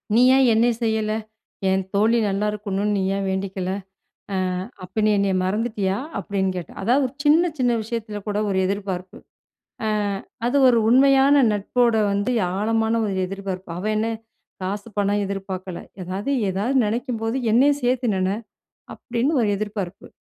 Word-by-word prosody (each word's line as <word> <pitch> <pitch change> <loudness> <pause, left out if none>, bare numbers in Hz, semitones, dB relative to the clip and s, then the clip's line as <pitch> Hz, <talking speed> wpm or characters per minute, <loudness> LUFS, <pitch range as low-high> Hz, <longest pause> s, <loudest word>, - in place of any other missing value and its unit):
"நீ 240 - +6
ஏன் 270 -1 +5
என்னைய 235 +2 +3
செய்யல. 220 -1 0 0.6
என் 190 0 +1
தோழி 225 +3 +3
நல்லா 200 +2 0
இருக்கணுனு 205 0 -2
நீ 195 - 0
ஏன் 195 - -2
வேண்டிக்கல. 190 -1 -2 0.6
அ - - 0 0.5
அப்ப 200 +4 -3
நீ 215 - +4
என்னைய 195 -1 +1
மறந்துட்டியா!" 205 -1 -1 0.2
அப்பிடின்னு 190 -2 -1
கேட்டா! 175 - -6
அதாவது 255 +7 +3
ஒரு 275 - -17
சின்ன, 330 +4 +4
சின்ன 245 -1 +2
விஷயத்தில 215 -2 -5
கூட 205 - -1
ஒரு 190 - 0
எதிர்பார்ப்பு. 190 -2 -4 0.7
அ - - +1 0.6
அது 260 +4 +1
ஒரு 235 -2 +4
உண்மையான 275 +2 +5 0.2
நட்போட 235 +4 +1 0.2
வந்து 205 +4 0 0.3
ஆழமான 225 +1 +1
ஒரு 200 -2 -1
எதிர்பார்ப்பு. 190 -2 -6
அவ 185 - -6
என்ன 220 +1 0 0.5
காசு 200 +3 -4
பணம் 205 +1 +1
எதிர்பார்க்கல. 190 -2 -5 0.2
ஏதாவது 190 +8 -4 0.2
ஏதாவது 205 +8 -1
நினைக்கும்போது 230 +1 -2 0.2
என்னையும் 285 +4 +4
சேர்த்து 250 -1 +1
நின. 185 0 0 0.7
அப்பிடின்னு 260 +5 -1
ஒரு 210 - +1
எதிர்பார்ப்பு. 200 -3 -5
210 Hz, 145 wpm, -23 LUFS, 195-235 Hz, 0.7 s, நீ